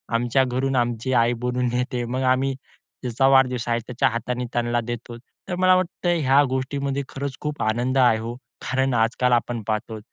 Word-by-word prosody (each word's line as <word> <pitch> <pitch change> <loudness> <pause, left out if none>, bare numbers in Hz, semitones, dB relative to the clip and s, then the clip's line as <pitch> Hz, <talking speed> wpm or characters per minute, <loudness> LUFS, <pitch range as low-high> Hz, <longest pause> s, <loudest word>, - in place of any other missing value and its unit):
आमच्या 120 +3 +2
घरून 130 +2 -1
आमची 120 +1 0
आई 120 0 +3
बोलवून 125 0 0
देते. 125 0 -2
मग 130 +2 -3
आम्ही 130 +1 +2
ज्याचा 130 -1 -3
वाढदिवस 130 -3 +3
आहे, 120 0 +1
त्याच्या 130 +1 +1
हाताने 125 +2 -3
त्यांना 120 0 0
देतो. 120 0 -6 0.3
तर 180 - -2
मला 185 0 +4
वाटतं 175 -1 0
ह्या 140 +2 +5
गोष्टीमध्ये 140 +1 -2
खरंच 140 -1 -5
खूप 150 -1 -3
आनंद 120 +4 0
आहे 120 -4 +5
हो. 115 +2 -5 0.4
कारण 130 -1 +1
आजकाल 120 +2 +2
आपण 120 -1 0
पाहतो 110 0 -2
125 Hz, 170 wpm, -23 LUFS, 120-135 Hz, 0.4 s, ह्या